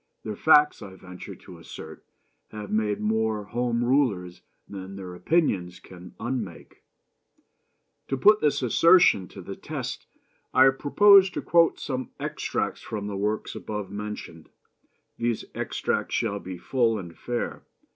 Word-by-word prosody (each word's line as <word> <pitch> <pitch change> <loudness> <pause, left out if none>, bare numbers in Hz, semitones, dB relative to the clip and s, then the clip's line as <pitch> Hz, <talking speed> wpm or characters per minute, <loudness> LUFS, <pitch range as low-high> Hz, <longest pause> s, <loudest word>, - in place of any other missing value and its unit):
Their 105 -1 -5
facts, 150 +4 +4
I 95 -1 -9
venture 90 -1 -10
to - - -14
assert, - - -10 0.5
have 105 -1 -8
made 105 -1 0
more 110 0 0
Home 120 +2 -1
Rulers 115 -10 0 0.3
than 95 -1 -8
their 95 -2 -8
opinions 90 - 0
can 90 -1 -13
unmake. 115 -8 -5 1.3
To 135 - -1
put 210 +11 +5
this 145 -2 +1
assertion 125 - +5
to - - -11
the - - -7
test - - -6 0.5
I 130 +1 +7
propose 195 +8 +6
to - - -5
quote 170 -1 +3
some 130 -3 -4
extracts - - -3
from 105 -2 -5
the 100 -1 -4
works 105 +2 -2
above 105 -3 -6
mentioned. 105 -6 -7 0.7
These 115 -1 -1
extracts - - -2
shall 100 0 -1
be 95 -2 -7
full 115 +2 +1
and 85 -4 -8
fair. 120 -1 -4
110 Hz, 135 wpm, -26 LUFS, 95-130 Hz, 1.3 s, I